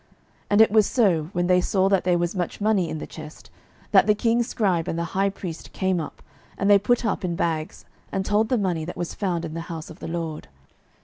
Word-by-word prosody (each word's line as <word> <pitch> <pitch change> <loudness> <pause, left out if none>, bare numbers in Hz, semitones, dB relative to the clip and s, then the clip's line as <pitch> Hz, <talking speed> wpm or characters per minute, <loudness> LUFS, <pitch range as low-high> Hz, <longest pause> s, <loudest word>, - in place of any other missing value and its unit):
12:012:010 - - -36 0.4
And 205 +1 +5
it 220 - +6
was 215 -1 +5
so, 190 -11 +2
when 175 0 0
they 180 0 +4
saw 190 +1 +1
that 195 -2 +2
there 180 -1 +3
was 175 +2 -1
much 180 -2 -3
money 205 -5 +1
in 155 - -4
the - - -6
chest, 155 -1 -11 0.4
that - - +6
the 210 - +4
king's 230 +2 +1
scribe 185 -9 0
and 165 - -2
the 170 - -1
high 195 +1 +2
priest 180 -4 -8
came 190 -2 0
up, - - -9 0.3
and 200 +1 +2
they 200 - +7
put 240 +4 +1
up 215 - -1
in 175 -2 -1
bags, 160 -2 -2 0.3
and 190 -1 -2
told 215 +2 +2
the 255 - +2
money 180 -6 -1
that 175 - -7
was 175 - -4
found 175 -4 -2
in 155 - -6
the 165 - -4
house 160 -2 -6
of 160 - -13
the - - -6
LORD. 165 -2 -4
185 Hz, 245 wpm, -24 LUFS, 165-205 Hz, 0.4 s, they